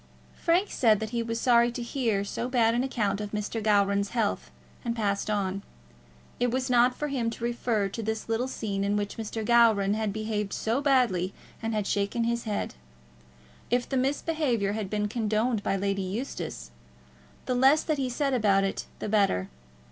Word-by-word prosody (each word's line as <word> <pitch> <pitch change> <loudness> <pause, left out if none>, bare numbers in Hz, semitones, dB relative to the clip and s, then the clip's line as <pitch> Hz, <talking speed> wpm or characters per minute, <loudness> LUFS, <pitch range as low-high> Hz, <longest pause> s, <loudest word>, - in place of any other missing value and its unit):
Frank 350 +4 +1
said 220 -5 +3
that 220 0 -4
he 235 -1 -1
was 230 0 -3
sorry 235 -1 +4
to 245 - -4
hear 230 -5 0
so 235 +4 -4
bad 230 -3 +3
an 240 +2 +1
account 210 -6 -1
of 210 0 -6
Mr. 210 +2 -2
Gowran's 200 -1 +2
health, 225 -4 -1 0.3
and 235 -2 -2
passed 205 -2 -1
on. 200 -2 -1 0.8
It 245 - +2
was 255 +1 -1
not 245 +1 +4
for 295 - -3
him 245 -4 0
to 230 0 -8
refer 235 -3 0
to 225 - -5
the 220 0 -2
little 225 +3 0
scene 200 -6 -3
in 200 +1 +1
which 205 -1 -3
Mr. 220 0 -4
Gowran 225 -4 +4
had 215 -1 -1
behaved 215 -1 -3
so 230 +5 0
badly 240 -10 +2 0.3
and 225 -1 -2
had 210 -2 0
shaken 200 +4 0
his 235 0 -1
head. 210 -2 -2 1.0
If 245 +1 +1
the 270 - -3
misbehaviour 265 -5 0
had 210 -3 -3
been 210 0 0
condoned 220 +1 0
by 195 - 0
Lady 195 0 -1
Eustace, 205 +9 -5 0.7
the 255 - 0
less 270 +5 +5
that 310 -3 -1
he 260 -2 0
said 275 +2 0
about 205 -5 +3
it 195 - -2
the - - -5
better. 195 - +2
225 Hz, 185 wpm, -27 LUFS, 205-245 Hz, 1.0 s, less